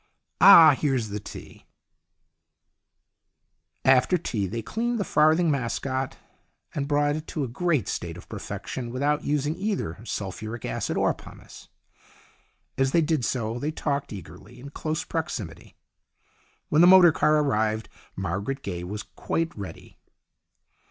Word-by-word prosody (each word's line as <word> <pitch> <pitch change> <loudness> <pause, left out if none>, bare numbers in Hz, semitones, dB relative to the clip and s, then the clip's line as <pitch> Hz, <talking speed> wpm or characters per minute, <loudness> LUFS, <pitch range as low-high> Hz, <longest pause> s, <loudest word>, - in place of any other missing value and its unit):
Ah, 170 -6 +10
here's 130 -7 0
the 105 +1 -4
tea! - - -11 1.5
" - - -51
After 135 +7 +4
tea 110 - -2
they 115 +4 -4
cleaned 235 - -2
the - - +1
farthing 160 0 +3
mascot, 130 0 -2 0.6
and 140 -1 -2
brought 145 0 +2
it 155 - -8
to 150 - -3
a - - -2
great 150 - 0
state - - -4
of - - -13
perfection, 120 -2 -6
without 145 +4 0
using 150 +1 0
either 185 - -3
sulphuric 110 +1 -5
acid - - -2
or - - +2
pumice. - - -14 1.1
As 135 0 +2
they 170 - +5
did 155 -4 0
so 115 -1 -2
they 145 - -2
talked 140 -2 -2
eagerly, 100 +5 -11
in 140 +3 -10
close 155 +3 -3
proximity. 110 - -5 0.9
When 155 - +4
the 175 - +8
motor 180 -2 +8
car 155 0 +2
arrived 110 -6 0 0.3
Margaret 100 - -3
Gaye 90 -3 -4
was 105 +4 -5
quite 165 0 -3
ready. 95 -6 -10
135 Hz, 140 wpm, -25 LUFS, 110-155 Hz, 1.5 s, Ah